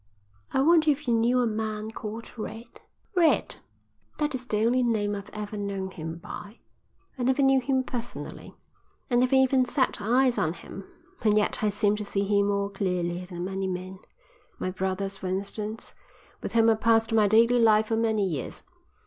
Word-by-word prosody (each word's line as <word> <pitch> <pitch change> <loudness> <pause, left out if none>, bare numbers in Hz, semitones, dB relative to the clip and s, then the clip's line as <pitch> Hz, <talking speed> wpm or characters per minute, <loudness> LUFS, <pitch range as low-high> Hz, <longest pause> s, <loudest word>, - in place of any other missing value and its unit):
"I 265 - +2
wonder 315 0 +5
if 295 -1 0
you 240 - +3
knew 235 +2 +3
a - - +2
man 215 -1 -3
called 220 +1 -7
Red?" 230 +1 -8 0.3
"Red?" 340 -3 +3 0.6
"That 300 -1 -1
is 255 -1 -5
the 215 -1 +1
only 250 +2 +3
name 215 -4 +1
I've 200 0 -6
ever 210 0 -6
known 195 -2 -3
him 165 -2 -6
by. 205 +4 -9 0.6
I - - -1
never 260 +3 +2
knew 270 -1 +4
him 260 0 +1
personally. 245 -2 -7 0.6
I - - +3
never 255 +2 +3
even 265 0 +4
set 255 -3 0
eyes 245 +4 +3
on 160 - +1
him. 190 +3 -10 0.4
And 215 -2 +3
yet 210 - +1
I 210 - +3
seem 205 0 +1
to 210 - -4
see 200 -1 -1
him 200 0 +2
more 200 0 0
clearly 180 -2 -2
than 175 -1 -6
many 190 0 -3
men, 185 +1 -5 0.6
my 185 - -3
brothers, 190 +1 -3
for 190 - -5
instance, 205 +3 -4 0.5
with - - -5
whom 225 -1 +5
I - - +5
passed 225 0 +2
my 215 -2 +5
daily 230 +4 +5
life 220 -1 +5
for 225 - +1
many 220 -2 +1
years. 155 -9 -4
215 Hz, 185 wpm, -27 LUFS, 195-245 Hz, 0.6 s, wonder